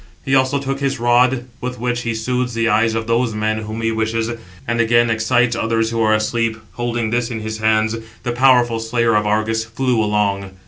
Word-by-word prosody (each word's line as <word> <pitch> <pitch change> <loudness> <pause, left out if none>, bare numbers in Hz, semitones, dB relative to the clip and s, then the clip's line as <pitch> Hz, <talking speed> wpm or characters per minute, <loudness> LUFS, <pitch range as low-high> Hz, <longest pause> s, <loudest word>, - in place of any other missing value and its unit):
He 135 - -1
also 130 +1 +3
took 135 0 -3
his 135 -2 -1
rod, 120 +1 +3 0.2
with 125 0 -4
which 125 0 -1
he 115 -1 -2
soothes 125 +1 -2
the 115 0 +1
eyes 110 +1 +2
of 115 0 -2
those 115 0 0
men 110 0 -1
whom 110 +1 -5
he 115 - +1
wishes, 110 +1 -1 0.4
and 115 0 +1
again 120 0 +3
excites 115 +2 +2
others 115 0 0
who 115 0 -1
are 110 -1 +3
asleep; 110 +1 -1
holding 120 -2 -2
this 120 0 0
in 115 -3 -5
his 110 0 -5
hands, 110 0 +2 0.3
the 120 - -1
powerful 120 -2 +3
slayer 115 0 +1
of 105 -1 +2
Argus 110 +1 0
flew 115 0 0
along. 100 -2 -1
115 Hz, 200 wpm, -19 LUFS, 110-120 Hz, 0.4 s, also